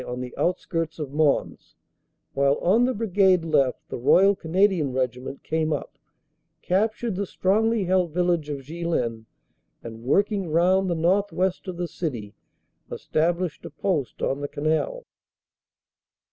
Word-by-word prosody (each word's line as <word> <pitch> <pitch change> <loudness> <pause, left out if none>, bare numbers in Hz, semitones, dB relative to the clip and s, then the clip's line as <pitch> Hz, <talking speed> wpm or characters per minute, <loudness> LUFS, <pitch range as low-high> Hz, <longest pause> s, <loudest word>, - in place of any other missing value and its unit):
on 125 0 -4
the 125 0 -6
outskirts 165 -2 -2
of 150 -4 -5
Mons, 150 -1 0 0.6
while 140 0 +3
on 220 +7 +3
the 255 - 0
Brigade 190 -5 +3
left 140 -5 +1
the - - -6
Royal 195 +10 +5
Canadian 180 -5 +1
Regiment 130 +1 -3
came 160 0 -1
up, - - -4 0.7
cap 215 +4 +1
tured 235 -5 -3
the 200 +1 -2
strongly 220 +4 +1
held 180 -2 +1
village 175 -2 0
of 140 -2 -4
Ghlin, 135 -7 -3 0.6
and 115 -1 -9
working 195 - +1
round 185 +4 +3
the 170 - 0
northwest 185 +2 0
of 180 -2 -5
the 175 0 -2
city, 120 - -5 0.6
established 170 +1 -1
a - - -7
post 150 -3 -2
on 135 +1 -1
the 145 - -2
canal. 160 - -1
170 Hz, 140 wpm, -24 LUFS, 145-190 Hz, 0.7 s, Royal